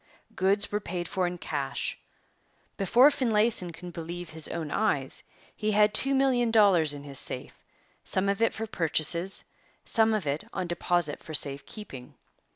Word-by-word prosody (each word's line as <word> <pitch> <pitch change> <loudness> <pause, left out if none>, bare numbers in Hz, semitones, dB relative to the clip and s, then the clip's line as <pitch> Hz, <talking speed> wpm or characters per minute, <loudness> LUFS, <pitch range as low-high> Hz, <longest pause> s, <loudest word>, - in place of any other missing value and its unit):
Goods 195 +2 +1
were 210 - 0
paid 175 -3 -4
for 185 0 0
in 175 0 -4
cash. - - -3 0.8
Before 240 +8 +5
Finlayson 220 -8 +1
could 175 +1 -10
believe 170 +1 -6
his 160 -1 -4
own 160 -3 -4
eyes, 145 -12 0 0.3
he 215 0 -1
had 210 0 +4
two 275 +5 +3
million 260 -3 +3
dollars 190 -9 +4
in 140 - -9
his 140 -2 -7
safe, 130 - -5 0.4
some 190 +1 0
of 200 +2 0
it 230 - +4
for 225 - -4
purchases, 170 -1 0 0.4
some 220 -1 +3
of 205 -6 -2
it 145 +2 -1
on - - -2
deposit 175 -2 0
for 155 - -6
safe 140 -1 0
keeping. 135 - -9
180 Hz, 165 wpm, -28 LUFS, 160-215 Hz, 0.8 s, Before